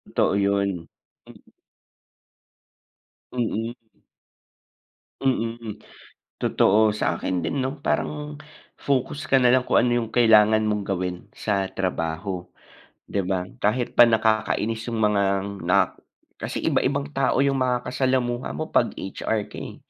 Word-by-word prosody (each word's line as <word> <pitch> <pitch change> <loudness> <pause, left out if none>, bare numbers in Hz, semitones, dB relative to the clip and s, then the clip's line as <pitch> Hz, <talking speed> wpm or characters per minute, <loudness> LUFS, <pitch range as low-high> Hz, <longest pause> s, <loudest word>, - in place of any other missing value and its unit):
Totoo - - +3
'yon. 100 -4 0 0.4
Mm. - - -17 1.8
Mm. 115 -1 -2 1.5
Mm, 115 -4 -2 0.6
totoo. 105 +1 +3
Sa - - -1
akin 90 -2 -2
din, 80 +11 -2
'no, 135 +2 -3
parang 150 0 -2 0.4
focus 140 +2 -1
ka 135 -2 +3
na 125 - +5
lang 130 0 +3
kung - - +3
ano 125 - +2
yung 110 - -6
kailangan 110 -2 +5
mong 105 -2 -1
gawin 90 -2 -2 0.2
sa 100 -3 -1
trabaho, 90 0 -3 0.6
'di 100 - -2
ba? 90 -2 0 0.2
Kahit 115 +4 0
pa 120 -1 +7
nakakainis 110 0 0
yung 115 -1 -2
mga 105 -1 +3 0.4
nak 90 +2 +1 0.4
kasi - - -4
iba-ibang 140 +2 0
tao 135 0 +2
yung 135 -1 +1
makasalamuha 125 0 0
mo - - -5
pag - - +3
HR 105 +2 -2
ka - - -7
eh. - - -7
110 Hz, 125 wpm, -24 LUFS, 100-125 Hz, 1.8 s, pa